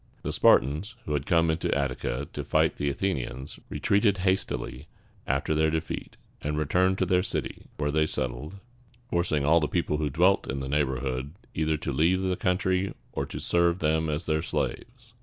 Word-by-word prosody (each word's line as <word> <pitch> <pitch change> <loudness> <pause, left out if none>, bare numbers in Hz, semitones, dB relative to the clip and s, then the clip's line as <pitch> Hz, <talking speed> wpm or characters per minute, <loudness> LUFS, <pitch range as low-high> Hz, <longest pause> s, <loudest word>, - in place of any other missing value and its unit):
The - - -2
Spartans, 80 - +3
who 75 - -2
had 70 -1 -1
come 85 -1 +4
into 80 - -1
Attica 70 -1 -2
to - - -4
fight - - +2
the 70 - 0
Athenians, 70 -4 -3
retreated 100 0 +2
hastily 90 -6 -1 0.4
after 70 +4 0
their 80 +1 +3
defeat, 80 0 -4 0.2
and 75 +1 -2
returned 90 +5 +2
to 95 - +1
their 90 0 +3
city, 95 - -4
where 75 -1 0
they 80 +1 +2
settled, 75 +6 -3 0.6
forcing 80 -5 +1
all 80 +3 +5
the 75 - 0
people 75 - 0
who 75 -1 0
dwelt 90 +7 +3
in 70 - -2
the 65 - -4
neighborhood 65 -1 -1 0.2
either 80 0 0
to - - -3
leave 90 +4 +2
the 95 -1 +1
country 95 +1 0 0.2
or - - -3
to - - -6
serve 85 0 +2
them 80 -1 +1
as 75 +1 -2
their 80 0 +1
slaves. 120 +7 -4
80 Hz, 175 wpm, -27 LUFS, 70-90 Hz, 0.6 s, all